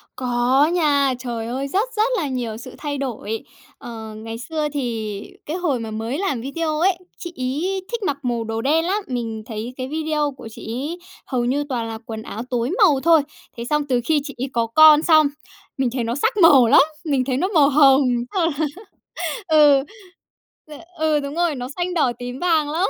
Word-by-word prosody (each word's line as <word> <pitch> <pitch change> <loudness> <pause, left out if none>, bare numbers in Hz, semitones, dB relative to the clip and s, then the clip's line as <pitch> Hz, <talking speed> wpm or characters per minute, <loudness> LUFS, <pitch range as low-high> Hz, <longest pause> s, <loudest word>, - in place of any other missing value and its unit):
Có 250 +3 +2
nha, 285 -6 +2
trời 235 -3 -4
ơi, 265 +4 -3
rất 400 - 0
rất 440 +3 +2
là 315 - -1
nhiều 245 -5 -3
sự 245 +2 -10
thay 290 -2 -4
đổi. 225 -5 -4 0.3
Ờ, 220 -2 -8
ngày 225 +1 -7
xưa 305 +5 -3
thì 225 -7 -3 0.2
cái 315 +4 -3
hồi 320 -9 0
mà 225 -1 -6
mới 225 +5 -3
làm 300 -10 -1
video 305 +4 -2
ấy, 360 +1 +3 0.2
chị 345 -1 -7
ấy 305 +10 -2
thích 470 -2 -3
mặc 285 -7 -1
màu 240 -2 -1
đồ 225 0 -3
đen 315 +6 +2
lắm, 400 +4 -1
mình 230 -4 -4
thấy 225 +2 -6
cái 255 -1 -4
video 305 0 -1
của - - -9
chị - - -11 0.2
ấy 330 +5 -5 0.3
hầu 250 -3 -1
như 275 +4 0
toàn 235 -4 -2
là 225 0 -5
quần 220 -1 -6
áo 220 - -6
tối 245 0 -1
màu 300 -8 +5
thôi. 330 -2 +6 0.4
Thế 235 - -4
xong 300 0 +1
từ 250 -2 +2
khi 305 0 +2
chị 280 -2 -8
ấy 260 +2 -3
có 230 -1 +1
con 305 +5 +7
xong, 310 -3 +5 0.5
mình 265 -2 +1
thấy 250 -2 -1
nó 230 +2 -2
sắc 445 - 0
màu 290 - +7
lắm, 270 - +7 0.2
mình 275 -4 +1
thấy 255 -1 -1
nó 365 +7 +1
màu 310 -8 +4
hồng, 275 -1 +6 1.3
xong - - -3
là 315 - +3
ừ, 285 -3 +6 0.8
t 305 - -11 0.3
ừ, 310 -1 +2
đúng 280 +1 -5
rồi, 340 -3 +1
nó 250 -1 -5
xanh 360 0 -2
đỏ 300 -8 +2
tím 245 +1 -6
vàng 320 -4 +2
lắm. 335 +6 0
275 Hz, 205 wpm, -21 LUFS, 240-315 Hz, 1.3 s, con